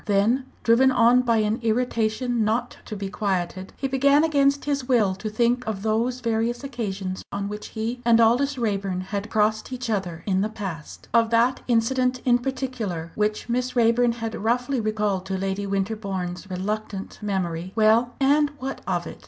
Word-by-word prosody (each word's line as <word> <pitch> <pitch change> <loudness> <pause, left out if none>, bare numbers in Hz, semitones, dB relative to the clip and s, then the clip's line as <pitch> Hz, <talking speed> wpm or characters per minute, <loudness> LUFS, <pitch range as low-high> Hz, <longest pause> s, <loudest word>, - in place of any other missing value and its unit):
Then, 215 +6 +2 0.2
driven 235 +3 +5
on 245 0 +5
by 235 -2 +2
an 215 +1 +1
irritation 230 0 0
not 230 +3 -1
to 215 - -6
be 200 -1 -4
quieted, 190 -1 -2
he 270 - -1
began 280 +3 +4
against 280 -3 +2
his 280 -3 -1
will 225 -7 +3
to 205 +3 -5
think 240 +3 +1
of 205 -3 -3
those 230 +3 0
various 230 +2 -1
occasions 200 -8 -4
on 200 0 -3
which 210 +1 -6
he 230 +2 -4
and 230 -1 +5
Aldous 255 +5 +3
Raeburn 200 -5 -1
had 200 +3 -4
crossed 215 +2 +1
each 250 -2 -3
other 175 -5 -3
in 190 -2 +1
the 210 - 0
past 190 -8 -7
of 230 -1 +4
that 235 +3 +2
incident 250 +2 +1
in 245 -1 +4
particular 245 -10 -4
which 215 +2 -1
Miss 250 +1 -1
Raeburn 235 0 +3
had 225 -1 -5
roughly 245 +4 0
recalled 210 -3 -1
to 190 0 -2
Lady 195 +1 -2
Winterbourne's 195 -2 -3
reluctant 195 +2 -4
memory. 185 -4 -2
Well, 225 +2 +3
and 290 +2 +4
what 270 +1 -5
of - - -1
it? - - -9
225 Hz, 170 wpm, -24 LUFS, 200-245 Hz, 0.2 s, driven